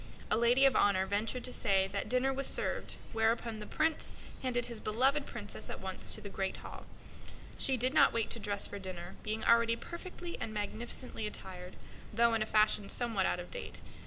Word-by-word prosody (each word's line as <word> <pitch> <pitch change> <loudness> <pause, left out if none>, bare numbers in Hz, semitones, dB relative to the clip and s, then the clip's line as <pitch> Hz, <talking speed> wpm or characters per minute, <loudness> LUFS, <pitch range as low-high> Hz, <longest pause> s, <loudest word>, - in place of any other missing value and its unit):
A - - +5
lady 240 +4 +5
of 270 - +5
honor 190 -2 +4
ventured 210 +5 -1
to 250 - -1
say 195 -4 +3
that - - -2
dinner 255 +2 +2
was 275 +1 0
served, - - -1 0.2
whereupon 225 0 +1
the 210 - -7
Prince 320 0 0 0.3
handed 245 -2 0
his 235 -2 -5
beloved 265 +6 +2
Princess 210 -4 -7
at - - -5
once 190 -1 -2
to - - -9
the - - -7
great 195 -1 -2
hall. - - -9 0.7
She 265 -1 +3
did 255 +3 +2
not - - +6
wait 230 -2 0
to 235 - -1
dress 205 -1 0
for 200 - -4
dinner, 185 -2 -6
being 215 +1 -3
already 230 0 +5
perfectly 345 +4 -7
and 220 - -2
magnificently 220 +2 -3
attired, 185 -3 -7 0.4
though 235 +2 +4
in 225 - +1
a 215 - 0
fashion 215 -2 +3
somewhat 225 -6 0
out - - 0
of 175 - -8
date. - - -5
225 Hz, 195 wpm, -33 LUFS, 200-250 Hz, 0.7 s, not